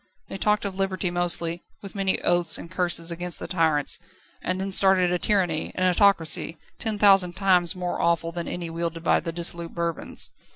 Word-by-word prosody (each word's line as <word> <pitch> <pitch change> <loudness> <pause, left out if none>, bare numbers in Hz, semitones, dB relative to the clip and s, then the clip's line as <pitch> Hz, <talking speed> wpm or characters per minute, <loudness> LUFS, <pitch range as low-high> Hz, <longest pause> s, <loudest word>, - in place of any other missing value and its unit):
They - - -6
talked 210 +1 +1
of 195 -1 -5
Liberty 190 -2 -1
mostly, 175 -1 +1 0.2
with 195 - -9
many 195 -2 -1
oaths 175 -1 +2
and 170 - -10
curses 175 -2 +1
against 175 +1 -3
the - - -7
tyrants, 160 -5 +2 0.4
and 185 +1 -3
then 195 +1 -4
started 190 -2 +4
a 180 - 0
tyranny, 180 -7 0
an 185 - +1
autocracy, 175 -4 +2 0.2
ten 220 -2 -2
thousand 195 -3 +5
times 180 -3 +2
more 180 -1 -4
awful 170 0 0
than 170 0 -6
any 170 -2 -5
wielded 165 0 -4
by - - +3
the 165 - -5
dissolute 170 0 -3
Bourbons. 170 -2 -2
175 Hz, 180 wpm, -24 LUFS, 170-190 Hz, 0.4 s, thousand